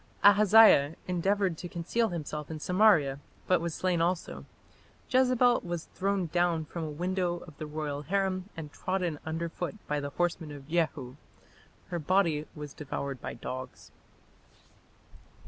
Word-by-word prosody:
Ahaziah 205 -7 +7
endeavoured 185 0 0
to 175 - -6
conceal 215 +8 0
himself 150 -3 -5
in 160 -1 -5
Samaria, 170 -7 +3 0.3
but 180 -2 +3
was 170 -2 -3
slain 180 -2 0
also. 175 +1 -2 0.7
Jezebel 255 -1 +4
was 175 -2 -5
thrown 195 -1 0
down 170 -1 +1
from 165 +2 -6
a 155 - -3
window 175 +3 -1
of 155 - -13
the 155 - -5
royal 150 -1 -4
harem 190 +3 -1
and 150 -2 -7
trodden 180 -5 -2
under 165 +1 -2
foot 175 +3 -5
by 150 0 -1
the 145 0 -4
horsemen 165 0 -2
of 140 -1 -11
Jehu; 155 -6 -1 0.7
her 175 - -2
body 165 -2 +1
was 150 -2 -7
devoured 140 -2 -5
by - - -5
dogs. 130 0 -7
170 Hz, 145 wpm, -29 LUFS, 150-185 Hz, 0.7 s, Ahaziah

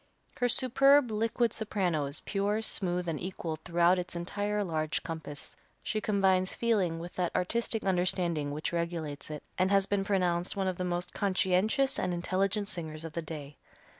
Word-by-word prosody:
Her 245 -1 +2
superb, 270 +1 +4
liquid 225 +1 +1
soprano 180 -9 0
is 140 +2 -3
pure, 205 +2 -1
smooth 180 -4 +1
and 160 -3 -2
equal 170 -3 -4
throughout 175 +2 +3
its 180 0 -4
entire 205 +4 -1
large 155 -4 -1
compass. 160 -3 -5 0.3
She 215 - -1
combines 190 -3 +2
feeling 200 -8 +1
with 170 +2 -7
that 180 -2 -2
artistic 225 +4 +1
understanding 175 -5 +1
which 150 +4 -3
regulates 170 -4 -3
it, 150 -1 -6 0.2
and 185 +1 +3
has 195 -1 +4
been 200 0 0
pronounced 180 -3 +1
one 195 -1 0
of 185 -2 -1
the 180 - -2
most 180 0 -2
conscientious 200 +7 +2
and 180 - 0
intelligent 195 +3 0
singers 160 -5 -5
of 160 - -7
the 170 - -2
day. 150 -3 -8
180 Hz, 165 wpm, -30 LUFS, 170-205 Hz, 0.3 s, superb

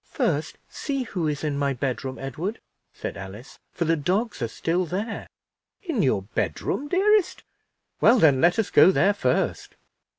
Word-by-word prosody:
"First - - -1
see 275 -2 -3
who 180 -8 -3
is 150 -1 -3
in 145 -2 -1
my 140 -1 +1
bedroom, 130 0 -3
Edward," 160 - -4 0.3
said - - -6
Alice, 100 +7 -10
"for 170 - -2
the 165 +1 +3
dogs 190 - -1
are 115 - 0
still 170 +9 -1
there." 205 +7 -4 0.6
"In 325 - -1
your 115 -8 +1
bedroom, 190 - -2
dearest? 390 +3 +2 0.6
Well, 240 - +6
then, 145 - +4
let 175 +1 +4
us 225 - 0
go - - +7
there 195 +1 +3
first." 130 -10 -1
170 Hz, 160 wpm, -25 LUFS, 135-225 Hz, 0.6 s, go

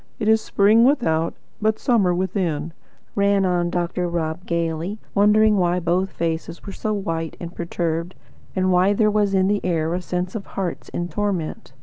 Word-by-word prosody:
It 215 - -2
is 220 0 +5
spring 210 +3 +4
without, 165 - +2 0.3
but 220 +1 +2
summer 220 -8 +2
within," 175 -4 -1 0.4
ran 200 -1 +2
on 175 -1 +1
Dr. 175 0 -1
Rob 170 0 -3
gaily, 170 +3 -2 0.2
wondering 210 +1 +4
why 180 -1 +2
both 180 +3 0
faces 165 -1 -4
were 200 - -6
so 215 - -3
white 165 -6 -3
and 170 0 -7
perturbed, 170 0 -3 0.4
and 185 -1 +2
why 185 +3 +4
there 215 +1 +3
was 205 -2 +2
in 190 0 +3
the 205 0 0
air 165 -2 0
a 180 - -1
sense 180 +1 -3
of 205 -3 -5
hearts 185 -3 -3
in 175 - -3
torment. 185 -8 -3
180 Hz, 170 wpm, -22 LUFS, 170-205 Hz, 0.4 s, is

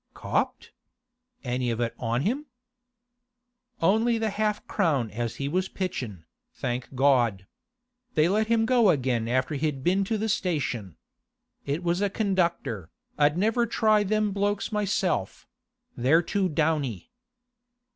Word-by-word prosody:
'Copped? - - -2 0.7
Any 125 -1 -1
of 115 -1 -2
it 120 -1 -1
on 120 +1 0
him?' 270 - -1 1.4
'Only 225 +6 +3
the 220 -1 -1
half 210 0 -1
crown 145 - 0
as 115 +2 -3
he 140 - -3
was 185 +5 -1
pitchin', 120 - -4 0.3
thank 125 +1 -4
God! 120 -8 +3 0.7
They 155 0 +4
let 215 +4 +1
him 225 0 +3
go 235 -3 +4
again 125 -7 +1
after 130 +5 0
he'd 145 -2 -2
been 185 +4 +2
to 220 +2 -1
the 220 +1 -1
station. 135 - -2 0.7
It 145 +5 -1
was 175 +2 0
a 205 - +2
conductor, 170 - -1 0.3
I'd 150 +2 +4
never 225 +5 +2
try 215 -1 +3
them 210 +1 +1
blokes 205 +1 -1
myself; 195 - -1 0.5
they're 145 +8 +3
too 195 +1 0
downy. 150 - -1
165 Hz, 135 wpm, -26 LUFS, 125-205 Hz, 1.4 s, They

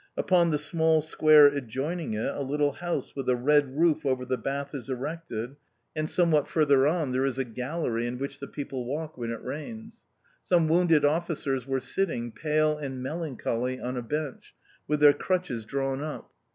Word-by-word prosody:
Upon 175 -3 +3
the 150 - +1
small 160 +1 +2
square 155 -1 +6
adjoining 140 +1 -1
it 110 - -2
a - - -4
little 145 +1 +1
house 175 +2 -4
with 135 -2 -3
a 125 - +4
red 140 +2 +2
roof 160 -2 +3
over 130 -2 0
the 130 - 0
bath 140 +2 -4
is 135 -2 -6
erected, 130 -2 -5 0.4
and 155 0 -2
somewhat 165 -5 +2
further 140 -3 +3
on 155 -4 0
there 130 +1 +1
is 135 -2 -1
a 135 - +1
gallery 125 0 -3
in 120 +1 -4
which 140 +1 -5
the 140 - -6
people 135 -4 -5
walk 150 +5 -4
when 120 -2 -4
it 115 -1 -5
rains. 220 +9 -7 0.4
Some 170 -3 +2
wounded 165 -2 +4
officers 145 -5 0
were 135 0 0
sitting 125 -3 -2
pale 155 +3 +1
and 135 -3 -5
melancholy 130 -5 -3
on 125 +1 -4
a 125 - -2
bench, 145 +3 -5 0.3
with 150 -1 0
their 145 -1 +8
crutches 175 - -2
drawn 135 +2 -2
up. 155 0 -6
145 Hz, 180 wpm, -27 LUFS, 130-155 Hz, 0.4 s, their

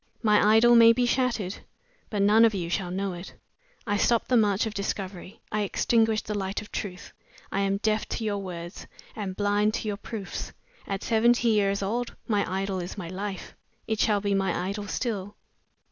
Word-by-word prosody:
"My 210 0 +5
idol 240 +2 +6
may 230 0 +8
be 245 +1 +1
shattered, 240 -6 0 0.5
but 205 -2 0
none 215 +3 +6
of 225 -2 +4
you 170 -3 -3
shall 180 0 -1
know 190 +1 -2
it. 175 +2 -9 0.5
I 205 -2 0
stop 230 +2 +2
the 255 - +3
march 210 -2 +3
of 220 - -4
discovery; 195 -2 -5
I 215 - 0
extinguish 220 +2 +2
the 210 - -4
light 195 -1 -2
of 210 - -11
truth. 180 -3 -6 0.4
I 195 - -1
am 195 0 +1
deaf 215 +1 0
to 230 - -3
your 205 -2 -1
words; 175 -2 -7 0.3
am 200 -4 -4
blind 205 +2 +1
to - - -4
your 205 -1 -2
proofs. 205 -2 -6 0.3
At 195 0 -3
seventy 235 +1 +3
years 200 -2 +2
old, 235 +5 -2
my 205 -4 0
idol 190 0 -2
is 175 +4 -7
my 175 -4 -6
life. 195 +1 -5 0.3
It 220 -1 -2
shall 205 -2 +2
be 200 0 0
my 195 -1 0
idol 205 +1 -4
still." 205 -4 -3
205 Hz, 190 wpm, -27 LUFS, 195-220 Hz, 0.5 s, may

